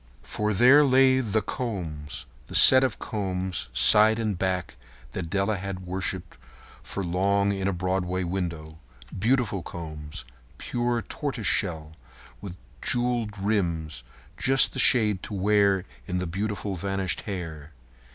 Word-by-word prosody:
For 105 0 -2
there 125 +8 +6
lay 130 -1 +4
The 110 -4 -1
Combs—the 85 - -6
set 130 0 +8
of 130 -5 -1
combs, 95 - -4
side 105 - +5
and 110 -3 -1
back, 90 -1 -2 0.4
that 85 -3 -5
Della 100 +3 0
had 95 0 -6
worshipped 95 -1 -4 0.6
long 100 +2 +1
in 95 -1 -2
a - - +1
Broadway 90 0 -2
window. 85 -3 -4 0.4
Beautiful 115 -3 +1
combs, 75 -5 -8 0.3
pure 120 -1 -2
tortoise 135 -7 -5
shell, 80 -5 0 0.5
with 95 -3 -7 0.3
jewelled 120 -4 0
rims—just 85 - 0
the - - -4
shade 105 -6 +2
to 105 - -6
wear 100 -1 +2 0.2
in 90 -2 -2
the 90 - -2
beautiful 100 +3 -3
vanished 95 0 -2
hair. 80 -6 -6
95 Hz, 120 wpm, -26 LUFS, 90-110 Hz, 0.6 s, set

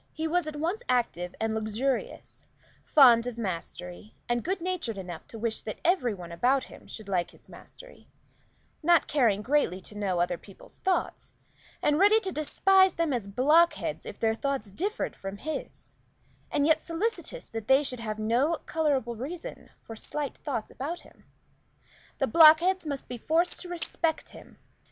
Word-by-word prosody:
He 320 0 -2
was 345 0 0
at 305 - -5
once 340 +9 -2
active 185 -8 0
and 225 0 0
luxurious; 220 +5 -3 0.4
fond 245 -5 +6
of 245 -2 -5
mastery, 180 -1 -6
and 240 0 0
good 375 +3 -1
natured 340 - -3
enough 180 -3 -7
to 225 - -10
wish 225 0 -2
that 215 - -6
every 320 -9 +3
one 175 -2 -9
about 255 +10 +2
him - - -13
should 215 -2 -8
like 180 -3 0
his - - -20
mastery; - - -14 0.7
not 340 -1 +4
caring 225 -8 +2
greatly 265 -8 +1
to 195 - -11
know 200 -3 -1
other 175 -1 0
people's 195 - -13
thoughts, 380 -1 -2 0.5
and 295 +1 +3
ready 415 +3 +6
to 385 - -3
despise 375 +5 +3
them 330 -4 0
as 230 -5 -2
blockheads 300 - +2
if - - -8
their 220 -1 +2
thoughts 245 -4 -3
differed 395 - -3
from 195 +1 -7
his, 310 +8 -6 0.6
and 285 - +1
yet 315 0 +4
solicitous 450 +8 -3
that 225 -1 -6
they 265 +2 +5
should 255 -3 -4
have 215 -2 -4
no 240 +9 +1
colorable 280 -7 0
reason 305 +9 -7
for 225 - -9
slight 290 +5 -4
thoughts 255 -8 -4
about 315 +6 -5
him. - - -20 0.9
The - - +1
blockheads 335 +2 +6
must 280 -2 -4
be 245 -1 -6
forced 330 +7 +1
to 360 - -5
respect 330 -2 -2
him. - - -15
270 Hz, 165 wpm, -28 LUFS, 220-330 Hz, 0.9 s, fond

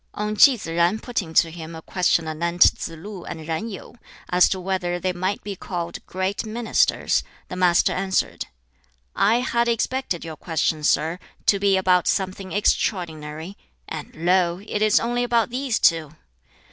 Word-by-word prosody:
On 210 0 -2
Ki 260 +3 +7
Tsz - - -8
jen 170 +4 +1
putting 220 -8 -4
to 165 - +4
him 165 0 -8
a 160 - -8
question 175 -3 +1
anent 170 +3 +3
Tsz - - -5
lu 190 +2 -9
and 160 -1 -7
Yen 165 +8 -3
Yu, 195 - -9 0.4
as 180 0 +5
to 190 - -2
whether 180 -1 -2
they 185 +1 -1
might 185 +3 -2
be 200 -1 -5
called 175 -2 -5
"great 190 +2 -2
ministers," 225 +1 +1 0.3
the - - -5
Master 180 -1 +3
answered, 190 0 -1 0.7
"I 220 +5 +3
had 235 -1 0
expected 235 -5 -1
your 160 -2 -7
question, 160 -2 -1
sir, 160 +4 +1 0.3
to 200 - +3
be 195 -1 +3
about 185 -1 +3
something 190 -1 -1
extraordinary, 165 -4 -1 0.3
and - - -7
lo! 175 +1 +2
it 210 - -2
is 215 0 +4
only 240 +1 -1
about 235 -1 +1
these 255 -2 -1
two. 160 -6 +2
185 Hz, 165 wpm, -23 LUFS, 170-210 Hz, 0.7 s, Ki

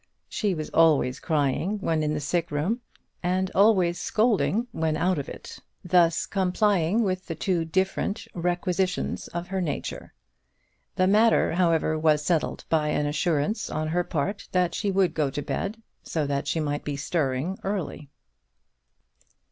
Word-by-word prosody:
She 205 -4 -1
was 155 -1 -5
always 150 -5 +3
crying 155 +5 0
when 165 -5 0
in 150 0 0
the - - -1
sick 165 +4 -1
room, 170 - -1 0.4
and 185 +1 0
always 190 -4 +4
scolding 220 0 +1
when 160 -5 -1
out 180 -1 +1
of 140 - -5
it; - - -9 0.3
thus 170 -2 +3
complying 195 +1 +1
with 185 -2 -2
the 165 - -4
two 170 0 0
different 190 +4 -1
requisitions 180 +1 -1
of 175 +1 -6
her 190 0 -1
nature. 160 -5 -4 0.8
The 185 - +3
matter, 215 +4 +4
however, 165 -3 +2
was 155 -1 +2
settled 165 -2 0
by 155 -2 +1
an 150 0 0
assurance 150 +6 0
on 155 0 -2
her 175 +2 +1
part 180 +6 -3
that 180 -1 +2
she 205 - -1
would 190 -3 +2
go 150 -4 0
to 145 +2 -4
bed, 200 +9 -3 0.2
so 155 -3 -2
that 140 0 -2
she 165 - 0
might 145 -1 -2
be 145 - -3
stirring 145 +3 -1
early. 190 -7 -4
170 Hz, 155 wpm, -26 LUFS, 155-190 Hz, 0.8 s, always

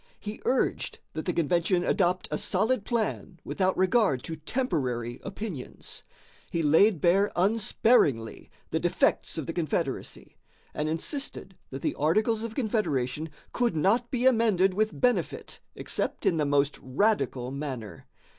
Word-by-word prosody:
He 210 0 -7
urged 260 - 0 0.2
that 155 - -4
the 180 - +1
convention 175 +2 +1
"adopt 180 0 +1
a - - 0
solid 215 +3 +1
plan 215 -6 -2
without 185 -1 0
regard 185 - +2
to 160 - -4
temporary 140 - -2
opinions." 195 - -7 0.5
He 165 - -1
laid 165 +5 +5
bare 195 +4 +3
unsparingly 195 - +2 0.2
the - - +1
defects - - +1
of - - -3
the - - -4
confederacy, - - -3 0.4
and 150 +1 -2
insisted 190 - -4
that 135 +1 -7
the - - 0
Articles 215 +9 +1
of 225 -1 -5
Confederation 160 - -1 0.2
could 240 -7 +1
not 220 +10 +2
be 250 -1 -1
amended 220 -7 +4
with 215 +3 0
benefit 250 -1 0 0.2
except - - -3
in 165 - +3
the 150 -2 +1
most 145 0 +1
radical 130 - 0
manner. 135 -6 -6
185 Hz, 135 wpm, -28 LUFS, 150-220 Hz, 0.5 s, laid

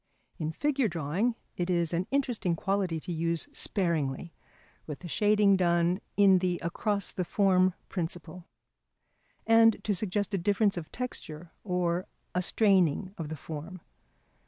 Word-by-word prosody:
In 155 -1 -2
figure 275 - +1
drawing 175 +8 -1 0.2
it 175 0 -2
is 170 -2 +1
an 175 +2 -1
interesting 245 -10 0
quality 190 -2 -1
to 180 - -6
use 165 0 -1
sparingly, 170 -5 -1 0.5
with 150 -2 -5
the 175 - -9
shading 205 +2 +4
done 175 0 +2 0.2
on 195 -2 +6
the 180 -1 0
across 200 +4 -1
the 185 - -1
form 185 0 +3
principle; 170 0 -5 1.0
and 225 0 +6
to 210 - +1
suggest 205 +2 -2
a 195 - +1
difference 205 +3 +2
of 170 -3 -6
texture 170 -10 -6
or 180 -2 -1 0.3
a 180 - +1
straining 190 -2 +2
of 155 -3 -4
the 155 - -5
form. 160 +5 -7
180 Hz, 140 wpm, -29 LUFS, 170-205 Hz, 1.0 s, on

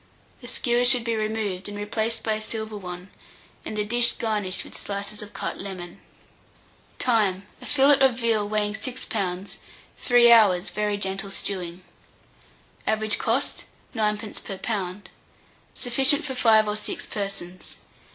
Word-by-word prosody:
The 245 - -10
skewers 245 0 +1
should 250 -2 +5
be 230 -1 0
removed, 215 -3 -2
and 205 - -6
replaced 220 +2 -2
by 220 - +1
a 215 - -3
silver 220 0 -4
one, 180 -1 -8 0.5
and 215 - -5
the 210 - 0
dish 240 +2 +2
garnished 210 -5 -1
with - - -11
slices 200 +1 -4
of 210 0 -9
cut - - -4
lemon. 180 -3 -7 1.0
Time. 205 -6 +2 0.2
A. - - -9
fillet 280 0 +5
of 265 -3 +5
veal 225 -4 +1
weighing 210 -1 0
6 255 +3 -3
lbs., 190 -3 -3 0.4
3 240 -1 +6
hours' 200 -6 +5
very 210 +1 -1
gentle 195 0 -2
stewing. 185 -2 -3 1.0
Average 215 -1 +1
cost, - - 0 0.3
9d. 210 -2 -2
per 195 - -6
lb. 195 -3 -3 0.7
Sufficient 265 +5 +3
for 265 - -3
5 220 -4 +5
or 210 - -1
6 215 - -4
persons. 195 -3 -6
215 Hz, 145 wpm, -25 LUFS, 195-230 Hz, 1.0 s, 3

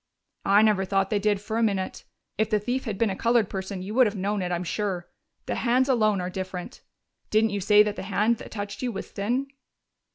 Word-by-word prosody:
"I 200 +2 +6
never 210 -3 +3
thought 195 0 0
they 210 - +2
did, 205 -1 +1
for 220 +3 -3
a - - +1
minute. 195 -4 -1 0.3
If 220 +1 0
the 215 - +3
thief 245 +6 -2
had 215 -4 -3
been 225 -1 +1
a - - -3
colored 230 -1 +2
person, 190 -1 -4
you 200 +3 -5
would 255 0 +5
have 210 - -3
known 200 +1 -1
it, 180 -1 -2
I'm 175 0 -1
sure. 185 -1 -2 0.4
The - - -2
hands 255 +2 +2
alone 215 -6 +3
are 180 0 -3
different. 185 -1 -6 0.5
Didn't 215 0 +3
you 200 0 -2
say 210 +2 +6
that 210 -1 -3
the - - -4
hand 210 +4 +1
that - - -9
touched 205 -2 -6
you 250 -1 -1
was 195 - -7
thin?" 245 +7 -1
205 Hz, 230 wpm, -26 LUFS, 195-220 Hz, 0.5 s, I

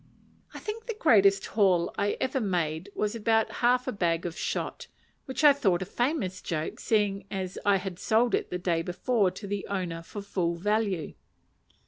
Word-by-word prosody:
I - - -9
think 445 +2 -6
the 460 - -3
greatest 200 - +4
haul 185 -5 +2
I 205 0 0
ever 260 0 0
made 175 -3 -1
was 210 -1 -1
about 225 -1 +1
half 250 +1 +3
a - - 0
bag 170 -4 0
of 170 -1 -4
shot, - - -3 0.4
which 265 +2 -4
I 295 -1 +9
thought 190 -10 +1
a - - -7
famous 240 - -1
joke, 160 -2 -3
seeing 205 -3 0
that 190 -2 -4
I 200 - +6
had 185 -2 -4
sold 225 +3 +2
it - - 0
the 180 - -2
day 175 -2 0
before 195 +4 +1
to 200 - -9
the 200 0 -3
owner 180 -4 -3
for 200 +4 -8
full 180 -4 -1
value. 200 -3 -1
200 Hz, 180 wpm, -28 LUFS, 180-225 Hz, 0.4 s, I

